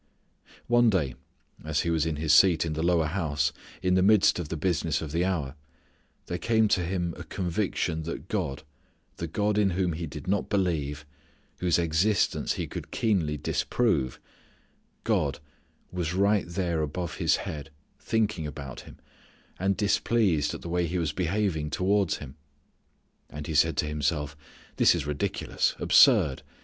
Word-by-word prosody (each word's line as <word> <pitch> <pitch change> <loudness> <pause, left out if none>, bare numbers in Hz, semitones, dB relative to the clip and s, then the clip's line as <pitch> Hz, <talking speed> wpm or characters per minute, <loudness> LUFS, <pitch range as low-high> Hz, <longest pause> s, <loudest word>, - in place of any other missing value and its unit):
One 120 -1 +4
day 80 - 0 0.5
as 75 -1 0
he 85 - -1
was 80 -1 +1
in 80 - -1
his 75 0 +1
seat 85 0 +5
in 80 - -2
the 80 - -3
lower 85 -1 +2
house, 75 -3 -1 0.3
in 90 0 +2
the 95 - +4
midst 100 -1 +4
of 80 -4 -5
the 80 - -3
business 85 -2 0
of 80 -2 -6
the 85 +3 +1
hour, 80 -8 -1 0.7
there 90 - -4
came 110 -1 +2
to 95 -3 +2
him 90 -1 -2
a - - -7
conviction 90 -3 -2
that 85 +1 -6
God 70 +3 -3 0.5
the 85 - -4
God 105 +5 0
in 100 -2 +3
whom 90 -3 +1
he 80 +1 -4
did 75 +2 -9
not 100 +2 0
believe, 75 -7 -1 0.5
whose 90 -2 +2
existence 85 +5 +1
he - - -3
could - - -7
keenly 90 -10 0
disprove 75 - 0 0.8
God - - 0 0.5
was 90 -1 -2
right 100 0 +2
there 85 -2 -1
above 80 +2 -4
his - - +3
head 75 -1 -6 0.3
thinking 105 -8 -1
about 70 -4 -7
him, - - -13 0.6
and 95 +1 +1
displeased 100 -7 +1
at - - -9
the 85 - -6
way 85 0 0
he 90 +3 -2
was 80 -3 -1
behaving 90 -3 -1
towards 95 +3 +1
Him. 70 0 -10 0.9
And 75 0 -7
he 80 - -4
said 80 +2 +3
to - - +1
himself: 75 -1 -2 0.4
"this - - +5
is 80 -4 -3
ridiculous, 75 -1 -1
absurd. 65 -3 +5
85 Hz, 160 wpm, -27 LUFS, 75-95 Hz, 0.9 s, seat